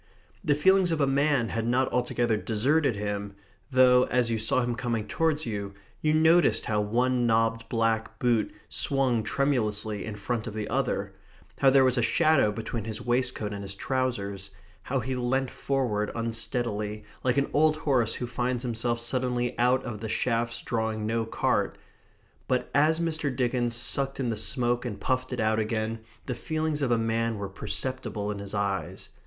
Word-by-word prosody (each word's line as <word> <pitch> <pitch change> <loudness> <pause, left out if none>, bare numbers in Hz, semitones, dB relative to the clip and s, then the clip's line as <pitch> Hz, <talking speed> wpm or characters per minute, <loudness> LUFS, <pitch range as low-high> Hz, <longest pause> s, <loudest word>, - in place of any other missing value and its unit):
The 145 - +3
feelings 190 +3 +4
of 165 - 0
a 140 - +4
man 140 -3 +2
had 115 0 -2
not 130 +2 +1
altogether 120 -2 +1
deserted 120 +6 +1
him, 100 0 -4 0.3
though 125 -1 +5
as 120 -2 +1
you 115 - 0
saw 110 +3 +1
him 120 0 -1
coming 115 -3 -2
towards 155 +5 0
you, 100 -3 -4 0.3
you 155 - +2
noticed 160 +2 +4
how 105 -2 +1
one 120 +3 +1
knobbed 115 0 +1
black 115 -1 0
boot 120 -4 +1 0.2
swung 130 -4 +1
tremulously 110 -5 -1
in 110 -2 -5
front 110 +2 -3
of 110 - -6
the 105 -1 -3
other; - - -1 0.5
how 135 - +6
there 135 0 +5
was 130 -1 +3
a - - +2
shadow 135 -2 +3
between 115 0 -5
his 110 -1 -4
waistcoat 120 -4 -1
and 100 - -5
his 95 -1 -3
trousers; 100 -6 -2 0.3
how 135 0 -2
he 130 +3 -3
leant 125 +1 0
forward 120 -7 -1
unsteadily, 115 -2 -2 0.2
like 125 +1 +1
an 140 - +1
old 155 +1 +4
horse 130 -7 +1
who 125 - -3
finds 125 +1 -2
himself 120 0 -1
suddenly 125 0 -1
out 125 +2 +3
of 115 -4 -5
the 110 0 -5
shafts 115 +1 -1
drawing 110 -2 -2
no 115 +1 0
cart. - - 0 0.7
But 125 -1 -1
as 155 +3 +3
Mr. 160 -3 0
Dickens 120 -1 0
sucked 135 +3 0
in 125 -3 0
the 115 - -1
smoke 120 +3 0
and 110 -5 -5
puffed 130 +3 -1
it 125 - -3
out 110 0 +2
again, 110 +1 -2 0.3
the 130 - -2
feelings 155 +4 -2
of 135 - +1
a 120 - +3
man 115 0 0
were 100 -1 -4
perceptible 105 +1 -3
in 100 - -5
his 100 +1 -5
eyes. 100 -1 -2
120 Hz, 175 wpm, -27 LUFS, 110-130 Hz, 0.7 s, how